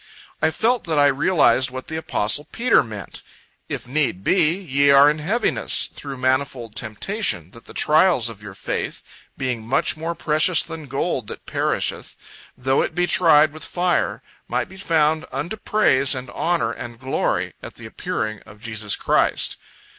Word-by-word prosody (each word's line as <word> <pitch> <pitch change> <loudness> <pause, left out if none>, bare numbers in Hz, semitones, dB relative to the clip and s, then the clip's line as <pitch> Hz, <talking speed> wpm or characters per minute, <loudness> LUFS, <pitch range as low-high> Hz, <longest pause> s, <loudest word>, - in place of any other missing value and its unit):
I 155 - +4
felt 230 +10 0
that 160 -3 -1
I 145 - +5
realized 135 -3 +3
what 130 +1 -7
the 160 - -6
apostle 150 -3 0
Peter 240 +1 +3
meant: 105 -6 -7 0.5
"If - - -5
need 130 -8 -1
be, 170 - +3
ye 140 -7 +1
are 140 +1 +7
in 150 - -4
heaviness, 205 +11 +2
through 140 -2 -8
manifold 130 -3 -1
temptation, 110 - -2
that 115 - -14
the - - -13
trials 155 -5 +4
of 110 -3 -7
your 100 -2 -10
faith, - - -4 0.3
being 125 -3 -2
much 115 +4 +1
more 165 +2 -4
precious 160 +2 +2
than 160 -3 -8
gold 135 -3 -2
that - - -9
perisheth, - - -2 0.4
though 130 +2 +1
it - - -3
be 175 0 +2
tried 155 -4 +4
with 155 0 -10
fire, 175 0 -1 0.2
might - - -1
be 190 - -13
found 160 -4 +1
unto 170 +8 -3
praise 140 -12 +2
and 125 -1 -6
honor 165 -10 0
and 115 0 -8
glory, 130 +1 -1
at - - -9
the - - -10
appearing 110 0 -4
of 105 - -16
Jesus 110 -2 -1
Christ." - - +1
140 Hz, 165 wpm, -22 LUFS, 120-165 Hz, 0.5 s, are